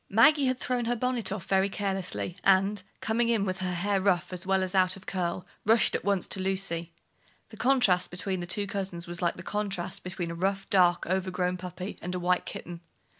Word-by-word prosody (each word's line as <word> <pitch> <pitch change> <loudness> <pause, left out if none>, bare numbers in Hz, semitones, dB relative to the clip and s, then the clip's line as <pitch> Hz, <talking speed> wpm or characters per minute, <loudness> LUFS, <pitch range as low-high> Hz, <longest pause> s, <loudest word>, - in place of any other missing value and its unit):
Maggie 270 +7 +5
had 255 0 +1
thrown 250 -2 -1
her 240 +1 +1
bonnet 240 -4 0
off 195 -3 -4
very 195 0 +2
carelessly, 190 -3 -2
and, 195 +1 +3 0.2
coming 230 +1 +1
in 220 -4 +2
with 185 -1 -2
her 185 -1 -2
hair 195 +2 0
rough 185 -2 +1
as 180 +1 -5
well 190 0 +3
as 185 0 -3
out 185 -1 +3
of 190 - -15
curl, 180 -1 -2 0.2
rushed 225 0 +4
at - - -1
once 200 -3 +1
to - - -1
Lucy. 185 -3 -1 0.6
The 220 - -12
contrast 230 -7 +3
between 185 +1 -3
the 175 - -5
two 200 +3 +1
cousins 190 -3 -4
was 175 0 -6
like 170 -1 0
the 185 - -8
contrast 200 -4 -2
between 180 -2 -4
a - - -4
rough, 195 +3 -1
dark, 175 -2 +4
overgrown 180 0 -1
puppy 180 +1 -7
and 180 +1 -4
a - - -2
white 180 0 +1
kitten. 170 -1 -7
190 Hz, 210 wpm, -28 LUFS, 180-205 Hz, 0.6 s, Maggie